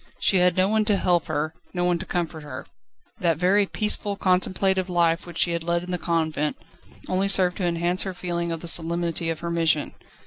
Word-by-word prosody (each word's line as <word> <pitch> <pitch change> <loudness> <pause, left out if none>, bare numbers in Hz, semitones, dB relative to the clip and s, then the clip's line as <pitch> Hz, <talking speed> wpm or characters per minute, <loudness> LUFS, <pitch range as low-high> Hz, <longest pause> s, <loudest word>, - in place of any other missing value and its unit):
She 195 - +3
had 180 0 +3
no 185 +1 +4
one 220 +1 +2
to 210 -2 +2
help 175 -3 +1
her, 155 +2 -2 0.2
no 175 - 0
one 175 -1 +1
to 190 - -7
comfort 170 -3 -3
her. 145 -3 -8 0.5
That 165 -4 +1
very 195 +4 +3
peaceful, 210 -1 -2
contemplative 185 0 +1
life 170 -1 +1
she 170 - +2
had 170 -1 -2
led 170 +1 0
in 180 - -6
the 180 - -1
convent, 160 -3 -1 0.5
only 190 +2 +1
served 185 -2 +4
to 185 - -1
enhance 175 +2 0
her 190 -2 -4
feeling 170 -1 -3
of 165 -1 -4
the 170 - -6
solemnity 170 0 0
of 165 -1 -4
her 170 - -3
mission. 165 -3 +1
175 Hz, 205 wpm, -24 LUFS, 165-185 Hz, 0.5 s, no